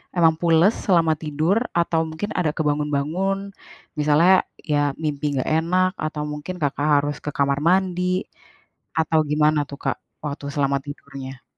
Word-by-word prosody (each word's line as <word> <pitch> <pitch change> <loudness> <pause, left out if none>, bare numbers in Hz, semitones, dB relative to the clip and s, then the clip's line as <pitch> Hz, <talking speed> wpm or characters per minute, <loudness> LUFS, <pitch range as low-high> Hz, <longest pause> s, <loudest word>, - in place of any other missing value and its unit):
emang 165 -2 +5
pules 170 +4 +4 0.2
selama 165 -4 +4
tidur? 155 +5 0 0.2
Atau, 165 -1 +1
mungkin 160 +7 -5
ada 160 -4 -1
kebangun-bangun? 155 +7 -1 0.5
Misalnya, 155 +6 +4 0.2
ya, 145 -2 0
mimpi 145 -1 -1
nggak 130 - -1
enak, 185 +2 +2
atau 155 -1 -3
mungkin 150 +4 -5
Kakak 145 +1 0 0.2
harus 145 0 -2
ke 150 - -5
kamar 140 0 +1
mandi? 185 0 +1 0.7
Atau, 160 0 +2
gimana 150 -1 +2
tuh, 140 - -9
Kak, - - 0 0.3
waktu 145 -1 -4
selama 140 -1 0
tidurnya? 135 -2 -9
155 Hz, 140 wpm, -22 LUFS, 145-175 Hz, 0.7 s, emang